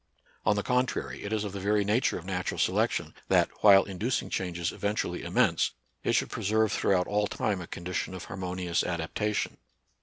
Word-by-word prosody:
On 105 - +5
the 100 - -1
contrary, 125 +1 -1
it 100 - -4
is 110 -1 0
of 105 - -4
the 100 - -5
very 105 +2 +2
nature 110 +5 +2
of 85 - -9
natural 95 -1 -2
selection, - - +1
that, - - +3
while 100 -2 +8
inducing 105 +6 -2
changes 85 -2 -2
eventu 105 +1 -1
ally 90 - -4
immense, - - +2 0.3
it - - +1
should - - +1
preserve 110 +1 +1
throughout 95 -3 +2
all 105 0 +1
time 100 -2 -1
a 85 - -7
condition 90 +1 -4
of 90 - -7
harmonious 90 -2 -2
adaptation. 90 +5 -2
100 Hz, 180 wpm, -29 LUFS, 90-105 Hz, 0.3 s, while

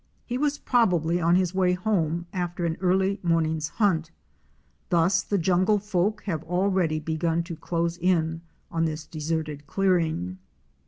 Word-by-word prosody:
He 245 - -3
was 295 0 +1
probably 175 - +2
on 170 +1 +4
his 180 -1 +1
way 185 -1 +2
home 175 -4 0
after 175 -1 -2
an 165 -1 0
early 190 +2 +2
morning's 160 -2 +1
hunt. 165 -4 +1 0.8
Thus 175 +2 +3
the 205 - -1
jungle 185 +4 +3
folk 210 +1 -1
have 165 -7 -2
already 180 -2 +1
begun 165 +2 -1
to 170 0 -6
close 170 +1 -2
in 165 -2 +1 0.3
on 165 0 +1
this 155 0 -3
deserted 155 -2 -4
clearing. 160 - 0
175 Hz, 145 wpm, -26 LUFS, 160-190 Hz, 0.8 s, on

